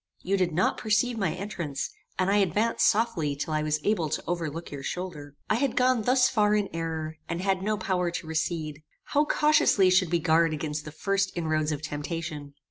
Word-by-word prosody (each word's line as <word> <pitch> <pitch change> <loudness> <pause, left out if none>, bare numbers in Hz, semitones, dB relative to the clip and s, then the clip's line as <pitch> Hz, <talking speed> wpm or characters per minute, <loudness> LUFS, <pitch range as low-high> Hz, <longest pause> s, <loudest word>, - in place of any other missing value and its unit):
You 195 +2 +1
did 185 -3 +1
not 175 +5 +1
perceive 220 +3 +1
my 195 - +1
entrance; 170 -8 -4 0.3
and 185 +1 +2
I 205 - +4
advanced 205 +4 +3
softly 205 -10 0
till 155 +3 -3
I 155 - +1
was 155 0 0
able 180 -7 +1
to 155 - -2
overlook 165 -1 -3
your 140 -1 -6
shoulder. 150 -4 -5
"I - - +2
had 270 0 0
gone 250 -2 +3
thus 250 +3 +4
far 210 -4 +2
in 205 -2 0
error, 160 -1 -3
and 170 - -2
had 190 0 0
no 210 +2 0
power 185 -2 0
to 170 - -5
recede. 160 -1 -2 0.2
How 295 +1 +1
cautiously 295 -12 +4
should 185 -2 +3
we 170 - +3
guard 165 -1 +3
against 150 -1 -4
the 150 - -7
first 195 +4 0
inroads 155 -2 0
of 150 0 -4
temptation! 150 -1 -5
175 Hz, 200 wpm, -27 LUFS, 155-205 Hz, 0.3 s, I